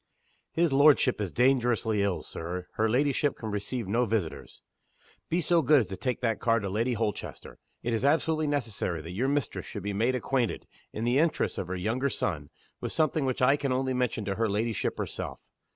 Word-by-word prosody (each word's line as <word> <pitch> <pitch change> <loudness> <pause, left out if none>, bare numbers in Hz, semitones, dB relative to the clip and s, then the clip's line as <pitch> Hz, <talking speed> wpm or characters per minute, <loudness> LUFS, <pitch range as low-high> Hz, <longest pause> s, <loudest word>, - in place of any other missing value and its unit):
"HIS 165 -3 +2
lordship 140 -4 +5
is 100 -4 -2
dangerously 120 -4 +2
ill, 100 -3 0
Sir. 90 +2 -5
Her 110 +1 +1
ladyship 140 +3 +2
can 110 -2 -5
receive 105 +2 -3
no 120 +5 +2
visitors." 85 - -3 0.7
"Be 175 +2 +1
so 170 +1 +3
good 145 0 +5
as 110 - -4
to 95 - -4
take 125 +6 -2
that 115 -4 0
card 115 -2 +2
to 95 - -3
Lady 115 +5 0
Holchester. 110 -2 -4 0.2
It 120 - -1
is 115 - -1
absolutely 155 +2 +2
necessary 110 - -2
that 85 - -7
your 115 +9 -1
mistress 140 -5 -1
should 100 - -6
be 100 0 -2
made 115 +6 +1
acquainted 125 -1 -1 0.3
in 110 - -4
the 120 +3 +3
interests 165 0 +1
of 90 - -3
her 95 - -3
younger 115 +9 0
son 75 - -2 0.3
with - - -4
something 155 -2 +1
which 130 -1 -1
I 135 +3 +6
can 140 -2 -2
only 130 +1 0
mention 125 -4 -1
to 100 0 -2
her 115 -1 +1
ladyship 110 +2 -1
herself." - - -4
120 Hz, 200 wpm, -28 LUFS, 105-135 Hz, 0.7 s, I